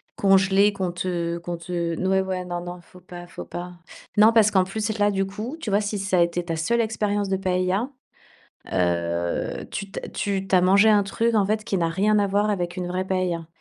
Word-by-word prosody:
congelées 195 +1 +4
qu'on 190 -3 -3
te 170 -1 -2
qu'on 170 0 -5
te 170 0 -3
n 185 +3 -2
ouais 190 0 +3
ouais, 185 -1 -3
non 175 -1 -4
non, 175 0 -7
faut 180 +1 -18
pas 175 0 -10
faut - - -8
pas. 180 +1 -7 0.4
Non 215 +1 +7
parce 225 -2 +5
qu'en 190 -3 +3
plus 215 +3 -3
là, 205 0 +3
du 195 -1 0
coup, 215 +9 -6
tu 220 -10 -4
vois? 205 - +3
Si 205 0 -3
ça 190 -2 +1
a - - +5
été 170 0 0
ta 165 -1 -2
seule 165 +9 0
expérience 210 -2 0
de 190 - 0
paëlla, 185 +4 0 0.8
heu, 85 -1 -1
tu 200 - -5
tu - - -5
as - - -8
tu 195 -1 -2
tu 190 - +2
as 180 - +5
mangé 200 +4 +5
un 210 -1 +5
truc, 225 +4 0
en 210 -2 +4
fait, 215 +1 0
qui 200 - -2
n'a 165 -1 +1
rien 205 +5 +2
à 200 - +2
voir 205 +2 +1
avec 175 -2 -3
une 180 - -2
vraie 185 +1 -2
paëlla 180 -3 -1
190 Hz, 235 wpm, -24 LUFS, 175-205 Hz, 0.8 s, Non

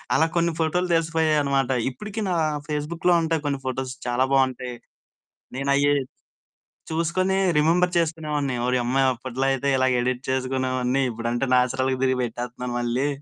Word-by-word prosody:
అలా 160 - +4
కొన్ని 170 0 +2
ఫోటోలు 175 +3 +1
తెలిసిపోయాయనమాట. 155 -5 +1 0.2
ఇప్పుడికీ 210 - -6
నా - - +1 0.3
ఫేస్‌బుక్‌లో 160 +4 0
ఉంటాయి 160 -1 -1
కొన్ని 140 -1 -1
ఫోటోస్, 130 0 -3
చాలా 120 +1 +2
బావుంటాయి. 130 -2 +1 0.8
నేనయ్యీ 140 +1 +2 1.0
చూసుకొని 170 +4 0 0.2
రిమెంబర్ 175 +4 +3
చేసుకొనేవాడిని, 150 -5 -1
ఓరియమ్మా! 125 +1 +1
అప్పట్లో 130 +2 -4
అయితే, 135 +1 -1
ఇలాగ 130 0 +2
ఎడిట్ 125 +1 -1
చేసుకునేవాడిని. 130 0 0
ఇప్పుడంటే 115 +3 -2
నాచురల్‌గా 130 +1 +1
తిరిగి 130 -1 +1
పెట్టేత్తన్నాను 120 +1 -5
మళ్ళీ, 120 +3 0
135 Hz, 125 wpm, -24 LUFS, 125-160 Hz, 1.0 s, అలా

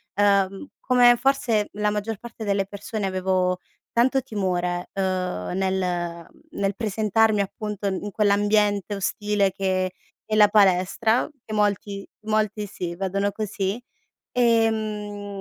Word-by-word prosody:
ehm, 200 +3 +2 0.2
come 245 -1 +7
forse 240 -5 +1
la 210 0 0
maggior 210 +1 -3
parte 235 +1 -9
delle 200 -2 +1
persone 205 +2 -5
avevo 185 -1 0 0.3
tanto 260 +3 +3
timore, 180 -6 -2
uhm, 185 - -2
nel 180 -3 -1 0.3
nel 195 -1 -1
presentarmi 215 0 +2
appunto 205 +1 -4
in 195 +1 -2
quell'ambiente 205 -1 +2
ostile 205 0 0
che 185 -1 -1 0.3
è 215 - -1
la 210 -1 +7
palestra 205 +4 +3 0.2
e 215 - -7
molti 205 -1 -1
molti 215 -1 0
sì, 175 -3 -5
vedono 195 +2 -1
così, 205 0 -3 0.5
ehm, 215 -4 0
205 Hz, 115 wpm, -24 LUFS, 190-215 Hz, 0.5 s, come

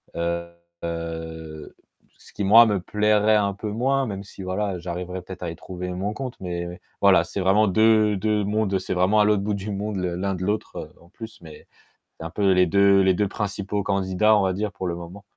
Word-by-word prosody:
heu, 85 0 -3 1.7
ce - - -18
qui 100 - -3
moi 115 +4 +8
me 105 -3 +1
plairait 105 +2 +2
un 100 -2 +1
peu 105 +2 -6
moins 135 +5 +1
même 100 -2 -5
si 100 - -12
voilà, 95 0 -2
j'arriverai 90 +1 -5
peut-être 90 0 -9
à 85 - -3
y - - -8
trouver 90 +1 -7
mon 100 +4 -3
compte, 130 +1 -6
mais 90 0 -5 0.2
voilà, - - +6
c'est - - -6
vraiment 100 +3 +3
deux 110 +1 +4
deux 105 +1 0
mondes 105 -1 0
c'est 95 - -4
vraiment 95 +4 +3
à - - +6
l'autre 105 -2 +2
bout 105 0 -1
du 100 +1 -4
monde 105 +1 -3
le 90 -2 -2
l'un 95 +2 -2
de 90 - -5
l'autre, 105 +2 -2
heu, - - -7
en 85 - -20
plus, 110 +1 -10
mais 80 -3 -13 0.5
c'est - - -8
un - - -6
peu 100 +2 +2
les 90 0 +4
2 100 +2 +4
les 95 -1 +3
2 105 +2 0
principaux 100 0 -3
candidats 100 +2 +2
on 105 - +3
va 95 -1 +1
dire, 105 +2 -2
pour 95 -2 -5
le 85 - -2
moment. 85 +4 -10
100 Hz, 220 wpm, -24 LUFS, 90-105 Hz, 1.7 s, moi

